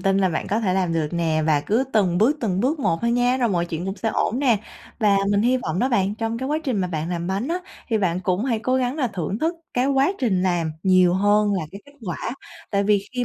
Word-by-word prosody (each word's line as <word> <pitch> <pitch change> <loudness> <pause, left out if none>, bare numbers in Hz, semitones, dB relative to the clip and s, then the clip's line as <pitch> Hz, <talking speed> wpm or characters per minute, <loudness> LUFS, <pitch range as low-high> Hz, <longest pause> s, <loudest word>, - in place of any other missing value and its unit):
tin 195 +1 +2
là 190 -1 +3
bạn 155 - -3
có 215 +3 0
thể 190 -5 0
làm 185 -3 0
được 160 -2 0
nè, 160 -2 0
và 150 -2 +3
cứ 220 - +1
từng 185 -5 +2
bước, 245 +9 +3
từng 190 -5 0
bước 280 +7 +1
một 165 -11 0
thôi 235 0 +1
nha, 245 +1 +2
rồi 245 -3 +1
mọi 175 -3 0
chuyện 170 +1 -4
cũng 195 +1 -4
sẽ 225 - -2
ổn 225 +2 0
nè. 255 -6 +3 0.4
Và 210 -3 +3
mình 205 +1 +2
hy 250 +2 +3
vọng 210 -7 -3
đó 255 - +2
bạn, 205 -5 +1
trong 225 +1 -3
cái 260 +2 -3
quá 305 - +1
trình 260 -7 0
mà 180 - -1
bạn 160 -1 -3
làm 175 -1 -3
bánh 195 +9 -2
á, 345 - 0 0.3
thì 225 -3 +1
bạn 180 -2 0
cũng 185 +4 0
hãy 240 -4 0
cố 255 +4 0
gắng 255 +2 -1
là 275 -5 +1
thưởng 195 0 -3
thức 325 +5 0 0.2
cái 250 +1 +2
quá 275 +5 +2
trình 195 -9 +1
làm 175 -4 0
nhiều 185 -2 +4
hơn 205 +2 +3
là 180 - -1
cái 200 - -9
kết 285 - -17
quả. 175 - -3 0.4
Tại 200 -1 +1
vì 205 -1 +2
khi 250 -1 -1
205 Hz, 275 wpm, -23 LUFS, 180-245 Hz, 0.4 s, nhiều